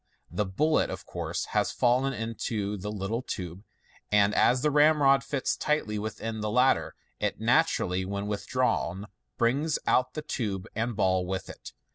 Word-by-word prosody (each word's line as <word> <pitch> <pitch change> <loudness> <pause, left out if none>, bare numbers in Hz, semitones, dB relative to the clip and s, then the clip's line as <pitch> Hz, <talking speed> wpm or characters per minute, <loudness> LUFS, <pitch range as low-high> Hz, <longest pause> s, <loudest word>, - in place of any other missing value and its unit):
The 105 - -1
bullet, 155 +12 +1
of - - -6
course, - - -3
has - - +2
fallen 125 +3 +2
into 115 -3 -3
the 105 +1 -5
little 105 +3 -2
tube, 90 -7 -6 0.5
and 105 0 +4
as 125 +1 +3
the 150 - +3
ramrod 145 -2 +5
fits 140 -3 -1
tightly 130 -9 -1
within 110 +1 -4
the 105 - -1
latter, 125 +5 +2 0.2
it - - -1
naturally, 90 +1 +2
when 100 +1 -3
withdrawn, 100 -2 -1 0.3
brings 140 +7 +1
out 125 +4 +2
tube 100 -7 -2
and 115 +1 -2
ball 95 -3 +1
with 95 0 -4
it. - - -12
110 Hz, 150 wpm, -28 LUFS, 100-130 Hz, 0.5 s, ramrod